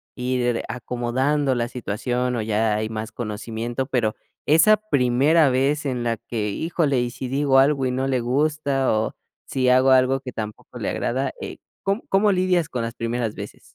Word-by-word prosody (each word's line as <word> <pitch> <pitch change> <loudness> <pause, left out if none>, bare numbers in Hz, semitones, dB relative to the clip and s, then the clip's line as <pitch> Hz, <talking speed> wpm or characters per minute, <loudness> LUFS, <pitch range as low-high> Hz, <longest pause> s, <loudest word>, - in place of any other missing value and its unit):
ir 125 -1 0
acomodando 130 +3 0
la 120 0 -1
situación, 125 +2 -2
o 115 - -1
ya 110 0 +1
hay 110 +1 -2
más 110 0 -5
conocimiento, 115 +3 -4
pero 120 -5 0 0.3
esa 165 +8 +6
primera 145 - +3
vez 140 +4 +1
en 125 -3 -2
la 115 -2 0
que: 105 -2 -3
"Híjole, 150 - 0
¿y 120 - -1
si 130 - -6
digo 135 +1 +2
algo 135 -1 +3
y - - -1
no 130 +1 -1
le 130 -2 +1
gusta?, 140 +1 +1
o 110 0 -1 0.3
si 130 -1 0
hago 130 +1 +5
algo 130 +1 +4
que 130 -2 -7
tampoco 110 -1 -7
le - - -2
agrada". 130 +3 -1
Eh, - - -6 0.3
¿cóm 200 +4 0
cómo 200 +2 +4
lidias 180 -3 +1
con 120 -2 -3
las 115 0 -4
primeras 115 -1 -2
veces? - - -8
125 Hz, 180 wpm, -23 LUFS, 120-140 Hz, 0.3 s, esa